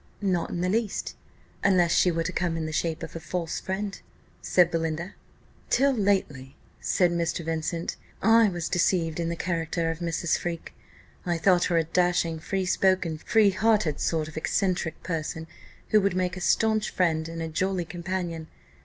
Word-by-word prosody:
"Not 185 -4 0
in 175 - -3
the 180 - +1
least, 220 0 -1 0.5
unless 180 -3 +4
she 180 - +4
were 165 -1 0
to - - -2
come 175 -2 -1
in 160 - -2
the 155 - -4
shape 165 0 -1
of - - -8
a - - -4
false 170 0 -3
friend," 200 +1 -4 0.4
said 175 -1 +3
Belinda. 165 +3 -2 0.6
"Till 275 +1 +3
lately," 190 - 0 0.2
said 180 -2 +2
Mr. 170 -1 -1
Vincent, 165 +1 -2 0.2
"I 225 +1 +5
was 175 -2 -3
deceived 175 -2 +1
in 170 -1 -1
the 170 - -2
character 165 -1 -1
of 165 - -6
Mrs. 170 -1 0
Freke. 170 -1 -5 0.5
I 175 -1 0
thought 180 +1 +4
her 170 - +1
a 165 - +3
dashing, 175 -1 +1
free 190 +3 -2
spoken, 180 -3 +1
free 215 +3 +4
hearted 190 -6 +2
sort 160 -2 0
of 155 - -10
eccentric 175 0 -1
person, 160 -1 -3 0.4
who 215 - +5
would 195 -2 +1
make 185 -1 0
a 185 - -7
staunch 220 +2 +2
friend 160 -3 0
and 165 0 -6
a - - -3
jolly 185 +2 -1
companion. 170 -1 -4
175 Hz, 175 wpm, -26 LUFS, 165-190 Hz, 0.6 s, I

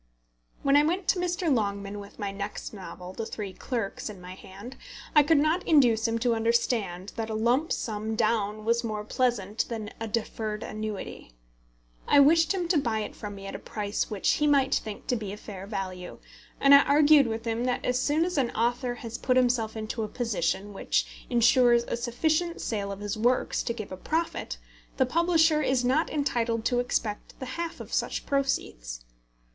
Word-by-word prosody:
When 275 0 +4
I 290 - +7
went 355 +4 -1
to 370 - +3
Mr. 350 -3 0
Longman 200 -3 -2
with 200 0 -11
my 205 -2 -3
next 200 +2 -6
novel, 185 -2 -9
The 225 +2 -5
Three 200 -3 -6
Clerks, 225 -1 -4
in 205 -3 -9
my 180 +1 -9
hand, 200 +7 -11 0.4
I 300 - +9
could 310 +2 +3
not 310 +5 +2
induce 240 -8 +4
him 225 0 0
to 240 -1 +2
understand 225 -5 0
that 225 -1 -3
a 220 - -2
lump 245 +8 +1
sum 220 0 -2
down 215 -1 0
was 235 +1 +2
more 215 -2 -3
pleasant 215 -3 -1
than 220 -3 -5
a 225 - -3
deferred 215 -1 -3
annuity. 215 - -6 0.7
I 285 - +6
wished 320 +3 +5
him 360 -3 -1
to 335 -4 +4
buy 225 -5 -1
it - - -6
from 205 -2 -7
me 195 0 -9
at 195 - -6
a - - -5
price 205 -1 -3
which 210 -3 -3
he 300 - +2
might 275 -2 +3
think 215 -2 -3
to 250 - 0
be 210 -4 -4
a - - -7
fair 195 -2 -9
value, 185 -3 -5 0.4
and 275 0 +6
I 280 - +10
argued 290 -1 +5
with 225 0 -4
him 230 +1 -1
that 250 -1 -1
as 250 0 +1
soon 300 +5 +2
as 360 -4 -1
an 250 -3 +1
author 245 +2 0
has 235 -1 -7
put 255 0 +2
himself 240 -3 +1
into 220 +1 -4
a 215 - -1
position 205 -4 -2
which - - -2
insures 240 0 +5
a - - -3
sufficient 315 +9 0
sale 200 -3 -3
of 200 0 -7
his 205 +1 -3
works 245 +3 +1
to - - -2
give 215 -4 -7
a 185 - -6
profit, 325 - -2 0.4
the 260 - +4
publisher 320 +1 +3
is 260 -4 +1
not 270 +6 +2
entitled 235 -6 -1
to 245 - +2
expect 225 -3 -3
the 260 - -5
half 335 0 -4
of - - -9
such - - -1
proceeds. - - -2
230 Hz, 195 wpm, -27 LUFS, 210-275 Hz, 0.7 s, I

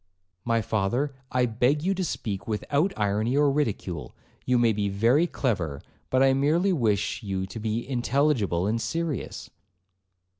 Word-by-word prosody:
'My 115 -1 +1
father, 115 +8 0 0.2
I 125 -1 +2
beg 125 +6 +1
you 190 +2 +2
to 190 -1 -2
speak 105 - -4
without 140 - 0
irony 105 +5 +1
or 145 -1 +4
ridicule; 100 - -2 0.3
you 125 -1 +3
may 120 -2 +3
be 100 -1 -1
very 115 - +3
clever, 90 - -2 0.3
but 130 +1 +3
I 135 0 +5
merely 160 +8 +2
wish 110 - 0
you 95 -2 -3
to 95 +4 -8
be 110 +2 -2
intelligible 125 - +1
and 115 +3 0
serious.' 160 +4 -3
120 Hz, 150 wpm, -26 LUFS, 105-140 Hz, 0.3 s, I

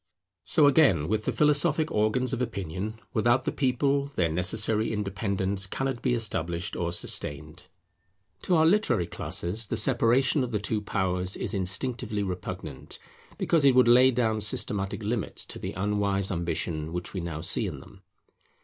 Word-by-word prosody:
So, 155 -3 +3
again, 135 - +4
with 110 +2 -1
the - - 0
philosophic 150 +1 +2
organs 110 +4 +1
of 130 - -2
opinion; 105 -1 -4
without 120 +2 +2
the - - 0
People, 140 +1 0
their 90 - -1
necessary 105 +6 +2
independence 100 -1 -1
cannot 135 +3 -3
be 125 -2 +1
established 85 -6 -1
or 85 -1 -2
sustained. 75 -1 -3 0.7
To 180 - +1
our 160 -1 +4
literary 185 - +2
classes 100 +6 -3
the - - -2
separation 130 +2 +3
of 125 - -4
the 110 - 0
two 105 +1 -2
powers 95 -2 0
is - - -2
instinctively 105 +3 -1
repugnant, 90 -6 -6 0.4
because 165 -3 +1
it 135 -2 +5
would 125 -1 +5
lay 125 +2 +7
down 115 -3 0
systematic 105 0 -1
limits 110 +1 -2
to - - -7
the - - -5
unwise 100 0 0
ambition 85 -2 -3
which 90 0 -4
we 95 - -3
now 80 -2 -5
see 85 - +2
in - - -6
them. - - -16
105 Hz, 160 wpm, -27 LUFS, 90-125 Hz, 0.7 s, lay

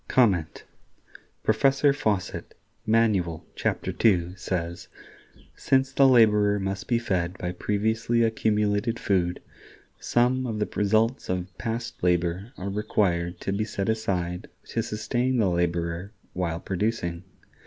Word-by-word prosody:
Professor 135 +5 +3
Fawcett, 105 -9 -2 0.3
"Manual" 105 -8 +2
(chap. - - -1 0.2
ii), 90 -5 +3
says: 85 -3 -4 0.7
"Since 135 0 +1
the 135 0 +5
laborer 105 -5 +5
must 95 0 -3
be 120 - +2
fed 90 -6 -1
by 90 +1 -3
previously 110 +5 0
accumulated 105 0 +1
food,... 90 -4 0 0.6
some 125 +2 +1
of 110 -2 -3
the 105 - 0
results 110 +5 +1
of 90 -1 -3
past 115 0 -4
labor 90 +4 0
are 95 +2 -4
required 90 -4 0
to - - -2
be 105 +2 0
set 100 -1 -3
aside 90 -5 -2 0.2
to - - -1
sustain 120 +4 -1
the 100 -6 +2
laborer 85 +2 -1 0.2
while 85 -2 -2
producing. 95 -3 -2
105 Hz, 120 wpm, -26 LUFS, 90-115 Hz, 0.7 s, the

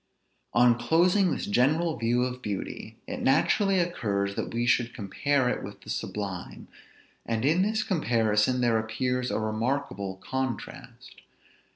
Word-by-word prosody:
On 120 0 +5
closing 175 +9 +3
this - - -2
general 155 +10 +2
view 120 +2 +1
of 125 0 -4
beauty, 105 -5 -5
it - - -5
naturally 195 +8 +3
occurs 100 - -1
that - - -4
we 120 +1 -1
should 120 -1 +1
compare 125 +6 0
it 125 - -1
with - - -9
the - - -7
sublime; 100 -4 -5 0.6
and 115 +1 -2
in 160 +6 +3
this 215 +2 +1
comparison 120 - +1
there 115 -2 +3
appears 125 +3 -1
a - - -1
remarkable 110 -2 -2
contrast. 130 +5 -6
125 Hz, 140 wpm, -27 LUFS, 110-145 Hz, 0.6 s, On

